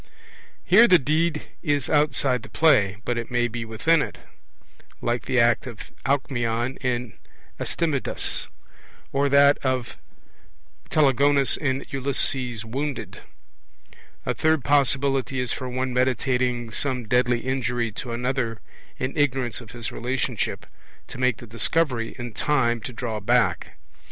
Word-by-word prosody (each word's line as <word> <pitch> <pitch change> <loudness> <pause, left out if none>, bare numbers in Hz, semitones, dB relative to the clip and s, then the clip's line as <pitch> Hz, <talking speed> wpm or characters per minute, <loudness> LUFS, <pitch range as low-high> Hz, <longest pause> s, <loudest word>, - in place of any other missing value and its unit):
Here 225 +6 +7
the 185 - +7
deed 155 +2 0 0.2
is 145 -6 0
outside 140 -4 +2
the - - -12
play; 115 -12 +3
but 120 -1 -1
it 115 - -6
may 120 -1 +1
be 120 0 -5
within 145 +9 +2
it, - - -4 0.8
like 120 0 -2
the 130 -2 +2
act 115 0 +3
of 120 -4 -7
the - - -9 0.2
Alcmeon 125 -2 0
in 125 -2 -2 0.5
Astydamas, 155 -6 -1 0.7
or 140 +1 +2
that 140 +1 +5
of 130 -3 -2 0.8
the - - -28
Telegonus 140 -1 +4
in 135 -2 -2
Ulysses 130 -3 0
Wounded. 135 +4 -4 1.1
A - - 0
third 160 -3 +1
possibility 135 -1 +1
is 125 -2 -1
for 130 -2 -4
one 130 0 -2
meditating 125 -1 0
some 125 -1 -1
deadly 125 0 +2
injury 120 -3 -1
to 120 +3 -6
another, 120 -1 -2 0.4
in 130 +1 -3
ignorance 130 -6 0
of 115 - -13
his 120 -1 -6
relationship, 125 +1 -2 0.4
to - - -9
make 125 -3 +2
the - - -10
discovery 120 +1 0
in 120 -2 -6
time 120 -5 +1
to 125 - -6
draw 115 -2 -4
back. 120 +2 +1
125 Hz, 135 wpm, -24 LUFS, 120-140 Hz, 1.1 s, Here